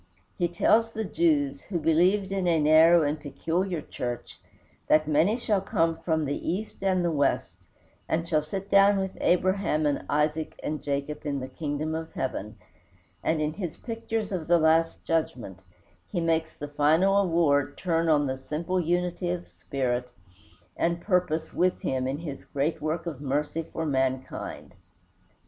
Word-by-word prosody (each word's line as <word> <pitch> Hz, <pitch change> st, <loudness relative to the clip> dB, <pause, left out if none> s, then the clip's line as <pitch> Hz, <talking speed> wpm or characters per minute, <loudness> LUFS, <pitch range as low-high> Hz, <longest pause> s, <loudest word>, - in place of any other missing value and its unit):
He 175 Hz, -, +1 dB
tells 220 Hz, +6 st, +3 dB
the 220 Hz, -, -2 dB
Jews, 295 Hz, -, +1 dB
who 185 Hz, -, -4 dB
believed 180 Hz, +5 st, +2 dB
in 190 Hz, -2 st, 0 dB
a 165 Hz, -2 st, +3 dB
narrow 160 Hz, +2 st, +6 dB
and 150 Hz, +1 st, -1 dB
peculiar 165 Hz, +4 st, -2 dB
church, 120 Hz, -1 st, -6 dB, 0.5 s
that 155 Hz, 0 st, +4 dB
"many 160 Hz, +9 st, +3 dB
shall 210 Hz, -5 st, 0 dB
come 165 Hz, -5 st, +1 dB
from 160 Hz, -2 st, 0 dB
the 145 Hz, +2 st, -3 dB
East 195 Hz, +2 st, -5 dB
and 185 Hz, -2 st, +2 dB
the 170 Hz, -, +1 dB
West, 145 Hz, -3 st, 0 dB, 0.5 s
and 165 Hz, +1 st, 0 dB
shall 155 Hz, -3 st, +2 dB
sit 195 Hz, +6 st, -6 dB
down 200 Hz, 0 st, +6 dB
with 190 Hz, -1 st, -2 dB
Abraham 185 Hz, -4 st, +2 dB
and 145 Hz, -1 st, 0 dB
Isaac 150 Hz, +2 st, 0 dB
and 155 Hz, 0 st, -3 dB
Jacob 140 Hz, +1 st, -3 dB
in 145 Hz, -2 st, -2 dB
the 130 Hz, -, -5 dB
kingdom 145 Hz, +3 st, -3 dB
of 160 Hz, 0 st, -5 dB
heaven," 110 Hz, -5 st, -4 dB, 0.7 s
and 160 Hz, -1 st, +1 dB
in 150 Hz, 0 st, -1 dB
his 175 Hz, -3 st, -5 dB
pictures 225 Hz, -2 st, -4 dB
of 175 Hz, -5 st, -3 dB
the 175 Hz, 0 st, +5 dB
last 165 Hz, +1 st, +2 dB
Judgment 125 Hz, -, -2 dB, 0.5 s
he 175 Hz, -, -2 dB
makes 160 Hz, -1 st, 0 dB
the 145 Hz, -, -6 dB
final 160 Hz, +7 st, +3 dB
award 160 Hz, -6 st, +2 dB
turn 165 Hz, -2 st, 0 dB
on 145 Hz, -2 st, +4 dB
the 130 Hz, -1 st, -2 dB
simple 165 Hz, +7 st, -2 dB
unity 175 Hz, +1 st, -1 dB
of 175 Hz, 0 st, -3 dB
spirit 125 Hz, -3 st, -3 dB, 0.7 s
and 170 Hz, 0 st, 0 dB
purpose 180 Hz, -5 st, 0 dB
with 180 Hz, +1 st, +1 dB
Him 130 Hz, -1 st, -1 dB
in 135 Hz, +2 st, -2 dB
his 145 Hz, -4 st, -7 dB
great 145 Hz, +4 st, -2 dB
work 160 Hz, +2 st, -2 dB
of 150 Hz, -5 st, -5 dB
mercy 150 Hz, +3 st, -1 dB
for 165 Hz, -, -3 dB
mankind. 130 Hz, -2 st, -2 dB
160 Hz, 165 wpm, -27 LUFS, 145-180 Hz, 0.7 s, narrow